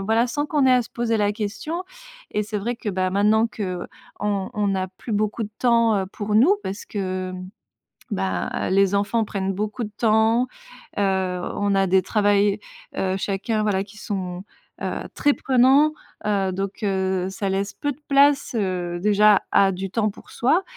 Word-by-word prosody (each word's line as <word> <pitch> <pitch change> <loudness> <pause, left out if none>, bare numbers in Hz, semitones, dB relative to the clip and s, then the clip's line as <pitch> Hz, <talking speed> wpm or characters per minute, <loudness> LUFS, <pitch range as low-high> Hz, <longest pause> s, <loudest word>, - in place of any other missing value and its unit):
voilà 225 +3 +2
sans 290 +5 -2
qu'on 295 -3 +2
ait - - +5
à 250 - +4
se 225 - -14
poser 235 -1 0
la 205 -1 +1
question 230 - -4 0.5
et 210 - 0
c'est 210 0 -3
vrai 235 +4 -3
que, 215 -3 -4
bah, 185 0 0
maintenant 210 +4 +3
qu'on 185 -6 -4 0.7
on 205 -1 0
n'a 190 -1 -1
plus 190 +5 -8
beaucoup 215 +2 0
de 210 - -5
temps, 230 -3 +3
heu, 190 - -5
pour 210 0 -3
nous 275 - +6
parce 195 +2 -5
que, 185 -2 -3
hem, 185 0 -7 0.6
bah, 190 -1 -2
les 195 +1 +3
enfants 205 +3 +1
prennent 195 -1 -2
beaucoup 210 +5 -3
de 210 - -5
temps, 225 +1 +3 0.6
heu, - - +2
on 190 +1 0
a 195 -1 +3
des 185 +1 +3
travails, 205 -1 +2 0.4
heu, 190 0 0
chacun, 210 +3 -1
voilà, 195 -2 +1
qui 205 +1 -16
sont, 185 -4 -4 0.4
heu, - - -3
très 290 -1 +3
prenants, 270 +4 +4 0.3
heu, 200 -2 +1
donc, 195 +3 -4
heu, 190 -2 0
ça 195 0 -3
laisse 200 +1 -1
peu 290 - -2
de 285 - -10
place, 280 -2 +4
heu, 180 -3 -2
déjà 210 +1 +5
A: 195 -1 +5
du 190 +1 -5
temps 215 0 +1
pour - - -16
soi 310 +10 +2
205 Hz, 180 wpm, -23 LUFS, 190-230 Hz, 0.7 s, nous